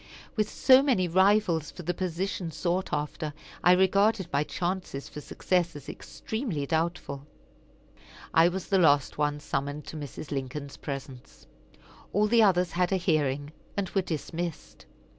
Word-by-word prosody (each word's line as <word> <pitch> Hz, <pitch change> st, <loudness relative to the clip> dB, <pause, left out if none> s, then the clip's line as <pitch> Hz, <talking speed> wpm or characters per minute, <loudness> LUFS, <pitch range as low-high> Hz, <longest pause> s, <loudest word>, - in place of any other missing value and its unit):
With 215 Hz, -2 st, +1 dB
so 260 Hz, 0 st, +6 dB
many 245 Hz, -11 st, +2 dB
rivals 190 Hz, -3 st, +3 dB
for 180 Hz, -, -10 dB
the 175 Hz, +2 st, -1 dB
position 185 Hz, 0 st, -2 dB
sought 175 Hz, +4 st, -1 dB
after, 150 Hz, 0 st, -3 dB, 0.3 s
I 180 Hz, -, +7 dB
regarded 190 Hz, +1 st, +3 dB
my 140 Hz, +1 st, +3 dB
chances 175 Hz, -4 st, -3 dB
for 150 Hz, -, -8 dB
success 175 Hz, +1 st, 0 dB
as 145 Hz, -2 st, -10 dB
extremely 220 Hz, -, -4 dB
doubtful. 160 Hz, -3 st, -2 dB, 1.1 s
I 165 Hz, +1 st, +6 dB
was 185 Hz, 0 st, -5 dB
the 195 Hz, -2 st, +4 dB
last 145 Hz, -4 st, +3 dB
one 150 Hz, 0 st, +1 dB
summoned 145 Hz, 0 st, -3 dB
to 160 Hz, -, -7 dB
Mrs. 145 Hz, 0 st, -7 dB
Lincoln's 140 Hz, +1 st, -4 dB
presence. 135 Hz, -3 st, -8 dB, 0.7 s
All 205 Hz, +2 st, +3 dB
the 230 Hz, +2 st, +4 dB
others 180 Hz, -4 st, +4 dB
had 180 Hz, +1 st, +1 dB
a 190 Hz, -, +3 dB
hearing, 145 Hz, -4 st, 0 dB, 0.3 s
and 195 Hz, -3 st, -1 dB
were 195 Hz, -, +2 dB
dismissed. 170 Hz, 0 st, -5 dB
170 Hz, 145 wpm, -28 LUFS, 150-190 Hz, 1.1 s, I